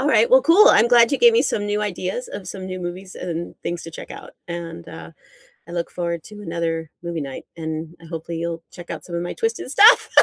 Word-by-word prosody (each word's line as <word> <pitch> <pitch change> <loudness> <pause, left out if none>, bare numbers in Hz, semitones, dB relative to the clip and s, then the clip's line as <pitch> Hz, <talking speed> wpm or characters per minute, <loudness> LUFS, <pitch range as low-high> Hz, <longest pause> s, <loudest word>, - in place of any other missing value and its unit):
Alright. 300 - +3
Well, - - +7
cool. 400 +7 +7
I'm 230 +2 +5
glad 240 +2 +6
you - - +1
gave 475 -1 +7
me 460 - +4
some 205 - -1
new 205 0 0
ideas 205 +3 -3
of 190 - -8
some 190 -2 -6
new 185 0 -5
movies 180 +2 -6
and 170 -1 -5
things 170 -1 -3
to 165 - -8
check - - -10
out. - - -9 0.2
And, 170 - -7
uh, - - -9 0.6
I - - -10
look 170 -1 -3
forward 170 -2 -3
to 210 -1 -11
another 165 -3 -3
movie 170 -2 -3
night, 135 -1 -7
and 160 0 -5
I - - -13
hopefully 165 0 -5
you'll 170 0 -4
check 175 -1 -11
out 160 -3 -6
some 170 - -6
of 170 - -1
my 175 - -4
Twisted 450 - -2
stuff 420 - +7
175 Hz, 235 wpm, -22 LUFS, 165-215 Hz, 0.6 s, Well